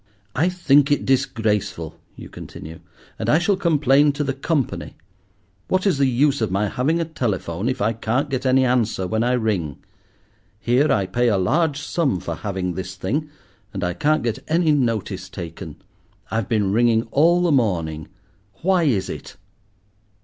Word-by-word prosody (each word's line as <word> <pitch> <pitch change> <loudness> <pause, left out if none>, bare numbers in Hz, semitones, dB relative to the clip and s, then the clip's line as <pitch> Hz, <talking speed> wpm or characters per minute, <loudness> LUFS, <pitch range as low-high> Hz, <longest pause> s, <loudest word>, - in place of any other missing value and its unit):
"I 170 +4 +2
think 145 -5 +3
it 145 - +1
disgraceful," 110 - 0 0.2
you - - -10
continue, 80 +1 -10 0.4
"and - - -2
I 150 - +5
shall 175 +4 +2
complain 150 -5 +3
to 145 +1 -2
the 135 -1 -1
Company. 140 0 -2 0.7
What 185 +1 0
is 185 -8 +2
the 135 - +4
use 135 +2 +2
of 110 - +1
my 100 +3 0
having 150 - 0
a 165 - 0
telephone 105 - -2
if 130 -5 -2
I 110 +2 +1
can't 115 +6 -1
get 135 -2 -3
any 130 0 +3
answer 115 -6 +1
when 110 +5 -1
I 125 +1 +1
ring? 100 - -1 0.8
Here 125 +8 +2
I 100 -2 +2
pay 120 +6 0
a 105 -4 +3
large 145 - +1
sum 145 - -1
for 85 -1 -4
having 95 0 -3
this 95 +1 -6
thing, 140 +12 -2 0.5
and 95 - -3
I 90 0 0
can't 155 - +1
get 115 -2 -1
any 165 0 +2
notice 110 -9 -1
taken. 85 -3 -8 0.6
I've 110 -2 -1
been 105 -4 +1
ringing 115 0 +3
all 170 +4 +4
the 175 - +2
morning. 85 - 0 0.6
Why 180 -2 +3
is 100 -10 +1
it?" - - -8
120 Hz, 170 wpm, -22 LUFS, 100-145 Hz, 0.8 s, I